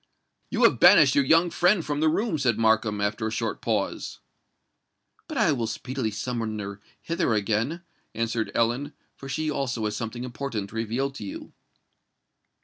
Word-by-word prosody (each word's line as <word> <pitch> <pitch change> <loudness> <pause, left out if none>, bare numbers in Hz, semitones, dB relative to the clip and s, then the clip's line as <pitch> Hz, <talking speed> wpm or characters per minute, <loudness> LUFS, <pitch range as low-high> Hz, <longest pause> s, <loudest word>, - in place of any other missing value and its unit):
"You - - 0
have - - +5
banished - - +7
your 285 - +4
young 165 -4 +4
friend 180 -1 +3
from 145 -1 -2
the 155 +1 +3
room," 185 0 0
said 120 -5 +1
Markham, 110 -2 +2
after 105 +2 -1
a - - -3
short 110 - -3
pause. - - -2 1.1
"But 310 - -5
I 215 -8 +4
will 120 -5 -1
speedily 120 +2 -3
summon 115 0 -3
her 100 0 -6 0.2
hither 165 -8 0
again," 115 - -1 0.3
answered 115 0 -1
Ellen; 120 +6 0 0.2
"for 135 - -10
she 155 +3 -1
also 125 -6 -2
has 105 0 -2
something 115 +3 -5
important 120 -5 -4
to - - -11
reveal 115 +5 -1
to 135 - -9
you." 100 - -8
120 Hz, 165 wpm, -26 LUFS, 110-150 Hz, 1.1 s, banished